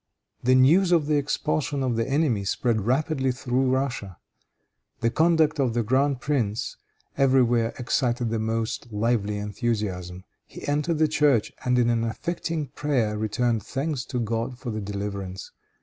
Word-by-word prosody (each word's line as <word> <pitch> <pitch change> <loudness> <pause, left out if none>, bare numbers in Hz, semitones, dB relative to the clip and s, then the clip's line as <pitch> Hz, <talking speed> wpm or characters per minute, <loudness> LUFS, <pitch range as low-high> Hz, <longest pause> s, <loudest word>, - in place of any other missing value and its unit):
The 130 +1 +4
news 165 +9 +5
of 165 -4 +4
the 150 0 +2
expulsion 145 0 -1
of 125 -3 0
the 115 +2 -1
enemy 135 -8 +1
spread 110 +1 0
rapidly 135 0 +1
through 125 +1 0
Russia. 125 -8 -2 0.8
The 115 0 +2
conduct 160 -1 +3
of 125 -4 +1
the 120 - +1
grand 130 +3 +1
prince 120 -8 -1 0.4
everywhere 120 -4 +3
excited 120 -2 0
the 115 - 0
most 115 +1 -2
lively 105 -1 0
enthusiasm. 105 -4 -3 0.2
He - - -10
entered 150 +3 0
the 155 0 +3
church, 145 -7 +2
and 125 0 +2
in 120 -1 +3
an 115 -1 +1
affecting 160 +4 -3
prayer 125 -7 0
returned 110 +2 0
thanks 135 +1 -3
to 125 - -3
God 115 +2 -2
for 125 -2 -5
the 110 0 -3
deliverance. 100 -2 -5
120 Hz, 150 wpm, -25 LUFS, 110-140 Hz, 0.8 s, news